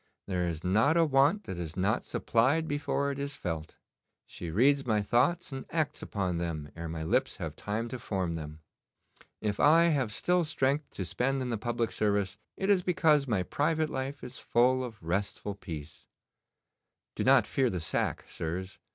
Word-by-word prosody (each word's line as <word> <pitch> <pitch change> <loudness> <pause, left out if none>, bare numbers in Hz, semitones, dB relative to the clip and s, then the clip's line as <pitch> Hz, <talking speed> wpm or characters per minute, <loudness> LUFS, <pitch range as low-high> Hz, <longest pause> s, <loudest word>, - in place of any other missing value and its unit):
'There 90 -2 -1
is 80 -1 -4
not 110 - +3
a 165 - +5
want 145 +8 +3
that 90 - -6
is 80 -1 -6
not 100 +5 +1
supplied 135 +8 +1
before 140 -1 -1
it 140 - -5
is 140 0 -3
felt. 80 - -5 0.5
She 85 - -7
reads 135 - +3
my 110 -4 +1
thoughts 145 - +2
and 135 -1 -5
acts 155 -3 -1
upon 95 -4 -2
them 80 -4 -4
ere 85 0 -5
my 80 0 -4
lips 80 - +1
have - - -5
time 110 +3 -3
to 125 - -5
form 95 -6 -2
them. 75 -1 -7 0.8
If 105 -2 -1
I 160 +3 +6
have 135 -8 +1
still 180 +10 +1
strength 145 -1 0
to 95 - -3
spend 135 +8 0
in 125 - -3
the - - +1
public 120 0 -1
service, 100 -2 0 0.2
it 190 - -1
is 190 -2 +4
because 155 -5 +3
my 105 -6 +1
private 155 - 0
life 135 +2 -4
is 125 +1 -6
full 130 +2 +3
of 110 -7 -8
restful 100 +4 -2
peace. 80 -6 -9 1.1
Do - - -2
not - - +6
fear 130 -2 +1
the 90 - -2
sack, 80 - -1
sirs. 90 +4 -5
115 Hz, 180 wpm, -30 LUFS, 90-140 Hz, 1.1 s, I